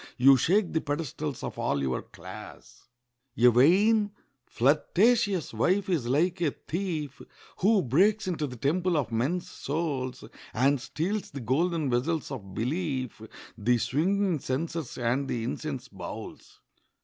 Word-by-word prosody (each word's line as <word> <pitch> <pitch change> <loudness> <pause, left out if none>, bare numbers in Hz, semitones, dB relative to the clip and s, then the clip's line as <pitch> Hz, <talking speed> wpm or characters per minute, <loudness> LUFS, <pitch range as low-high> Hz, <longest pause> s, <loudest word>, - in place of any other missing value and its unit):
You 135 +2 +7
shake 180 - +2
the 160 - +1
pedestals 145 -1 -4
of - - -5
all 70 - 0
your 65 -2 -1
class. - - -12 0.5
A 120 +1 +6
vain, 205 - +4 0.4
flirtatious 185 - +2
wife 185 - +1
is 155 -10 0
like 170 +8 +1
a 165 - +3
thief 155 -3 -4 0.4
Who 200 +1 +3
breaks 195 - +3
into 160 -5 -1
the 125 - -8
temple 170 +8 +1
of 135 -5 -1
men's 135 +11 -1
souls, 140 -4 -3 0.3
And 135 0 +3
steals 190 +9 -3
the 140 - -7
golden 150 - 0
vessels 145 +6 0
of 100 -8 -7
belief, 130 -2 -2 0.3
The 120 +2 +2
swinging 180 - +1
censers, 150 +3 -3
and 125 +3 0
the 120 -3 -2
incense 135 +1 -4
bowls. 100 -6 -9
150 Hz, 135 wpm, -28 LUFS, 125-180 Hz, 0.5 s, You